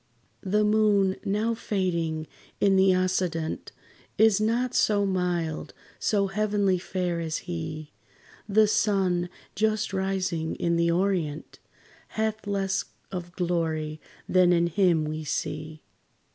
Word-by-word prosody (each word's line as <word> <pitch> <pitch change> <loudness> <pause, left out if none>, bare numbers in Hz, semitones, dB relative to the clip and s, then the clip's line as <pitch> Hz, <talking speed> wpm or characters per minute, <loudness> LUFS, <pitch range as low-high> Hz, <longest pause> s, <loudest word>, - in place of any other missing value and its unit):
The 210 +2 +1
moon, 210 -3 +3
now 215 +4 0
fading 170 -8 -1 0.3
in 195 -1 +4
the 190 0 +5
occident, 180 -3 -1 0.5
Is 220 -2 +5
not 235 +3 +1
so 205 -1 +3
mild, 180 -4 -2 0.2
so 200 -2 +2
heavenly 200 -1 +1
fair 180 -2 -2
as 160 -1 -2
he. 160 -3 -5 0.6
The 215 +2 +5
sun, 190 -4 +1 0.2
just 215 0 0
rising 190 -4 -1
in 170 0 0
the 170 0 +2
orient, 170 -4 -1 0.6
Hath 220 -1 -1
less 195 -1 0 0.3
of 175 -2 -6
glory 160 -4 -1 0.3
than 180 -1 +4
in 170 -1 +3
him 170 -2 +2
we 155 +1 -4
see. 155 +1 -4
185 Hz, 115 wpm, -26 LUFS, 170-205 Hz, 0.6 s, the